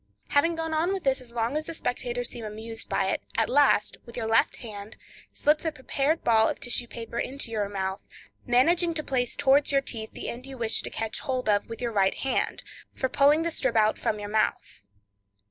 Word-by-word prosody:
Having 330 +4 +3
gone 325 0 -3
on 335 +5 +1
with 385 -3 -3
this 270 -1 +2
as 245 -2 -11
long 235 +3 -1
as 310 0 -2
the 330 - -4
spectators 245 -3 -2
seem 235 - -7
amused 220 +1 -6
by 195 - +1
it; - - -1 0.2
at 225 - +3
last, 275 -6 +4
with 235 - -11
your 230 - -2
left 225 0 +3
hand, 210 -2 -8 0.4
slip 300 +1 +2
the 320 - -2
prepared 290 +2 -1
ball 220 -1 +4
of - - -4
tissue 245 -2 0
paper 235 0 -6
into 265 -2 -3
your 210 -3 -1
mouth, 190 -1 -3 0.4
managing 330 +8 +3
to 305 - -1
place 250 -4 -1
towards 285 0 +4
your 275 - +4
teeth 225 -5 -5
the - - -6
end 250 +3 -6
you 270 -1 -8
wish 225 -2 0
to - - -5
catch 225 -1 -3
hold 255 -2 -2
of 205 0 +2
with 230 +2 -6
your 235 - -1
right 195 -3 +2
hand, 270 - -1 0.3
for 260 - -1
pulling 290 +5 +4
the 335 - -1
strip 260 -6 -1
out 215 -1 +3
from 215 - 0
your 205 - -5
mouth. 210 - -1
245 Hz, 215 wpm, -27 LUFS, 225-285 Hz, 0.4 s, last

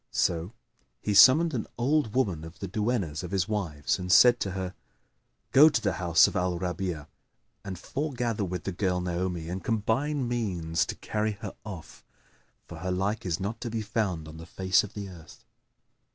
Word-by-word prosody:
So 85 +3 0 0.5
he 105 - -2
summoned 150 +11 +7
an 115 -4 -2
old 125 -2 +1
woman 95 -12 0
of 80 +2 -10
the - - -5
duennas 105 -9 -1
of 90 - -6
his 95 -1 0
wives 90 -8 -1
and 90 0 -3
said 120 +5 +7
to 95 - -2
her, 95 -1 -4 0.8
"Go 150 +4 +8
to 145 - 0
the 100 -4 0
house 85 -2 +6
of - - -5
Al 90 -1 0
Rabi'a 90 -3 -3 0.6
and 95 -3 -6
foregather 120 - -2
with 90 -2 -4
the 95 - -3
girl 90 0 0
Naomi 90 -1 -2
and 90 +2 -5
combine 125 +5 0
means 90 -9 -1
to - - -4
carry 110 0 -2
her 100 - -5
off; 95 -7 -9 0.6
for - - -10
her 95 - -4
like 95 +3 -1
is 85 0 -1
not 105 +4 -4
to 120 - -3
be 110 -1 -3
found 95 -8 -2
on 80 0 -10
the 80 +1 -10
face 95 0 +2
of 105 +1 -9
the 100 -1 -5
earth." 85 -4 -13
95 Hz, 185 wpm, -28 LUFS, 90-115 Hz, 0.8 s, Go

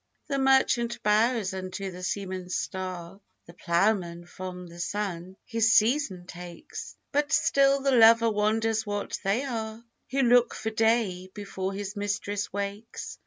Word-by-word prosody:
The 275 -2 -2
merchant 265 -3 +2
bows 215 -1 +2
unto 190 +1 -5
the 180 0 -9
seaman's 185 -1 -3
star, 185 0 -5 0.2
The 170 - -13
ploughman 175 -1 0
from 180 0 -8
the 170 0 -12
sun 185 -1 -4
his 225 -2 +2
season 215 -6 +2
takes; 175 -1 -9
But 290 0 0
still 275 0 +3
the 275 - +3
lover 230 -1 +6
wonders 220 +1 +1
what 205 -1 -3
they 205 +7 +1
are, 225 -3 -5 0.2
Who 270 0 +1
look 245 0 +4
for 220 - -3
day 220 -5 +1
before 195 -2 -4
his 200 +1 -5
mistress 205 0 -2
wakes. 200 +2 -5
205 Hz, 140 wpm, -27 LUFS, 185-230 Hz, 0.2 s, lover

